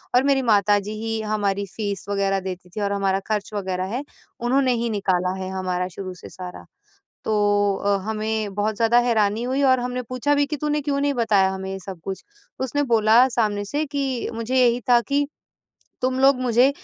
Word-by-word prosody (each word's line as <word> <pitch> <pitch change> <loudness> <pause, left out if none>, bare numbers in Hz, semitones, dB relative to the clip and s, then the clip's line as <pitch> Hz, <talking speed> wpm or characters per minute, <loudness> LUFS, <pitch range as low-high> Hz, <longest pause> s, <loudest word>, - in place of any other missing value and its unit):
और 250 - +5
मेरी 275 -1 +3
माता-जी 205 -3 +2
ही 225 0 -2
हमारी 205 -2 -1
फीस 205 -4 -3
वग़ैरह 195 -1 +1
देती 185 -1 -7
थी 210 +4 -6
और 200 0 0
हमारा 195 -1 +1
खर्च 210 -2 -1
वग़ैरह 190 -2 -2
है, 265 - -2 0.4
उन्होंने 255 +2 +2
ही 235 - -1
निकाला 185 -4 0
है 185 - -4
हमारा 185 -1 -2
शुरू 185 -2 -6
से 180 - -12
सारा। 180 -1 -9 0.6
तो 205 -2 +2
अ, 200 0 +1
हमें 215 -1 -2
बहुत 205 +1 -1
ज़्यादा 230 +2 +4
हैरानी 225 -2 +1
हुई 265 +3 0
और 260 -2 +4
हमने 250 +1 -3
पूछा 255 +4 0
भी 285 0 +2
कि 300 +1 -3
तूने 300 +1 -1
क्यों 280 -1 -1
नहीं 285 0 +1
बताया 215 -6 +3
हमें 190 0 -5
ये 195 - -4
सब 185 -2 -8
कुछ? 195 -1 -5 0.4
उसने 265 +3 0
बोला 230 -1 +5
सामने 210 -4 0
से 290 +9 -2
कि 275 -3 -2
मुझे 230 +3 -2
यही 245 -1 +4
था 240 -1 +7
कि 285 +4 0 0.8
तुम 255 0 0
लोग 270 -1 +5
मुझे 250 +1 +4
220 Hz, 190 wpm, -23 LUFS, 200-255 Hz, 0.8 s, था